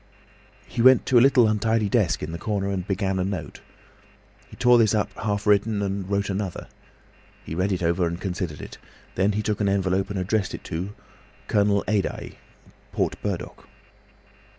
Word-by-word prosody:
He - - -3
went 130 +1 +6
to 125 - +5
a - - +5
little 130 -3 +5
untidy 110 0 +1
desk 95 - +1
in 75 - -4
the 85 - -6
corner, 100 0 -2
and 95 -1 -3
began 95 -1 -1
a - - +1
note. 95 -4 -5 0.9
He - - -13
tore 125 -1 +5
this 110 -1 +3
up 105 - -1
half 105 -1 -3
written, 105 0 +2
and 100 -1 -3
wrote 100 0 0
another. 95 -2 -4 0.8
He - - -6
read 90 +4 0
it 90 -2 -1
over 85 +1 +1
and 85 +1 -4
considered 90 -5 -4
it. - - -10 0.3
Then 100 +3 +1
he 105 +1 -1
took 105 -1 -1
an 100 - +2
envelope 95 0 0
and 100 - -4
addressed 95 +2 -1
it - - -10
to 95 +6 -5 0.5
"Colonel 100 -1 +2
Adye, 105 -2 -2 0.5
Port - - -1
Burdock." - - -5
100 Hz, 175 wpm, -24 LUFS, 95-105 Hz, 0.9 s, went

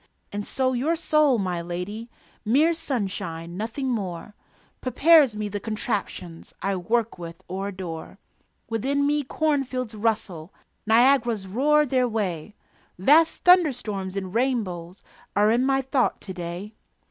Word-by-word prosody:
And 205 0 -4
so 260 -1 0
your 280 +7 +1
soul, 305 -5 +3
my 180 -4 -2
lady 180 +7 -5 0.3
(Mere 285 +10 +3
sunshine, 195 - -4
nothing 225 +7 -3
more) 200 -5 -3 0.5
Prepares 285 -1 +5
me 210 0 -3
the 205 0 -4
contraptions 205 -6 -4
I 195 +1 -1
work 220 +3 -1
with 170 -1 -9
or 190 +2 -4
adore. 185 -3 -7 0.5
Within 270 +6 0
me 295 +1 +2
cornfields 265 -5 -1
rustle, 205 -6 -2 0.4
Niagaras 235 -2 +4
roar 295 +10 +3
their 255 -2 +1
way, 205 -4 -3 0.4
Vast 305 - +4
thunderstorms 245 - +3
and 190 -1 -4
rainbows 205 -8 -2 0.3
Are 210 +1 +4
in 240 +2 +2
my 270 0 +2
thought 265 -1 0
to 190 - -7
day. 180 +4 -6
220 Hz, 130 wpm, -25 LUFS, 190-265 Hz, 0.5 s, Prepares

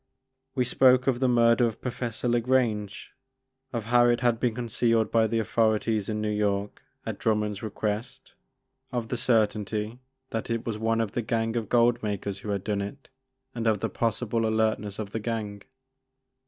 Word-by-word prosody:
We 125 -2 +2
spoke 130 +1 +4
of 130 -3 +1
the 130 - +2
murder 120 0 +4
of 110 - -5
Professor 120 -1 -3
ta 120 0 +3
Grange, 115 -5 0 0.6
of 115 -3 -3
how 120 +2 +4
it 120 0 +2
had 120 -2 +2
been 120 -3 0
concealed 115 -1 +1
by 115 -1 +4
the 115 +1 -1
authorities 110 -1 +1
in 105 -1 -2
New 105 0 -1
York 105 -1 -1 0.2
at - - -4
Drummond's 105 -2 0
request, 105 +1 -4 0.6
of 120 -2 -3
the - - -1
cer 115 -3 +4
tainty 105 +2 -5 0.3
that 115 +1 -3
it 115 -1 -2
was 110 -2 -3
one 115 +1 +1
of 110 -3 -2
the 120 - -1
gang 115 0 -1
of 115 -4 -2
gold 120 0 +3
makers 100 -2 -3
who 105 - -7
had 100 -2 -1
done 105 -1 -1
it, 100 +8 -7 0.4
and 115 -1 -2
of 110 -2 +2
the - - -2
possible 115 0 0
alertness 110 -2 0
of 105 -2 -5
the 110 - -2
gang. 105 -2 -4
115 Hz, 180 wpm, -27 LUFS, 105-120 Hz, 0.6 s, spoke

